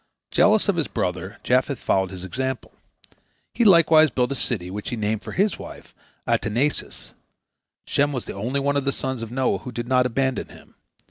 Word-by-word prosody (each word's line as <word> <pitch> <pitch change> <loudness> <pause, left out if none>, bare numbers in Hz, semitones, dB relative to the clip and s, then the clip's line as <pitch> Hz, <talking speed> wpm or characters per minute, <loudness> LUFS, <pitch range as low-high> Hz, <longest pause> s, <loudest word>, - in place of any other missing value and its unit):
Jealous 215 +1 +4
of 200 -4 +1
his 160 - 0
brother, 95 +4 -3
Japheth 130 +2 +1
followed 95 -1 0
his 90 -1 -8
example. 130 +5 -4 0.8
He 235 - +1
likewise 165 -5 +6
built 125 0 0
a - - -1
city 95 -9 -2
which 105 +1 -5
he - - -3
named 110 -1 -1
for - - -8
his 200 +2 +1
wife, - - -11 0.3
Adataneses. 125 +7 -1 0.7
Shem 145 +1 +1
was 130 -4 -4
the - - -6
only 120 +8 -2
one 140 +1 0
of 140 - -1
the 140 - +2
sons 130 -3 -3
of 115 - -5
Noah 130 +1 0
who 125 - -8
did 120 0 -5
not 125 0 +3
abandon 130 +2 -1
him. - - -16
130 Hz, 190 wpm, -23 LUFS, 110-140 Hz, 0.8 s, likewise